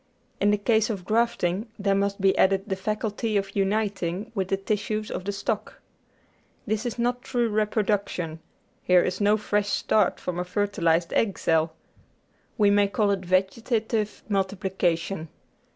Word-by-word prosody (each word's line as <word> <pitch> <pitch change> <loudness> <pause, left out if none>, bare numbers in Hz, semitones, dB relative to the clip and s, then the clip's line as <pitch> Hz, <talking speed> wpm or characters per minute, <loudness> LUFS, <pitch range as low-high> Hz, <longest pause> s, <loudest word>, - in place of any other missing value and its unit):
In 205 - +3
the 210 - +3
case 220 +1 +2
of 195 -5 -4
grafting 220 -2 +1
there 200 -1 +1
must 200 +1 0
be 190 0 +3
added 195 0 +3
the 195 -3 -2
faculty 215 +2 -2
of 195 0 -3
uniting 200 -1 -1
with 190 -4 -1
the 195 - 0
tissues 215 +2 -2
of 185 - -4
the 200 - -1
stock. 205 +2 -3 0.9
This 220 +3 -1
is 240 - -4
not 245 +1 0
true 245 -2 0
reproduction; 205 -6 -1 0.4
here 180 -1 +4
is 185 +2 -2
no 205 +1 +4
fresh 205 -1 0
start 210 -1 +2
from 175 -1 -4
a - - 0
fertilised 175 -4 0
egg 205 -4 +1
cell. 160 0 +1 0.8
We 205 -3 +4
may 205 0 +4
call 205 0 +1
it 195 -2 0
vege 185 +4 +1
tative 220 -3 -1
multiplication. 190 -4 -1
200 Hz, 155 wpm, -26 LUFS, 190-215 Hz, 0.9 s, here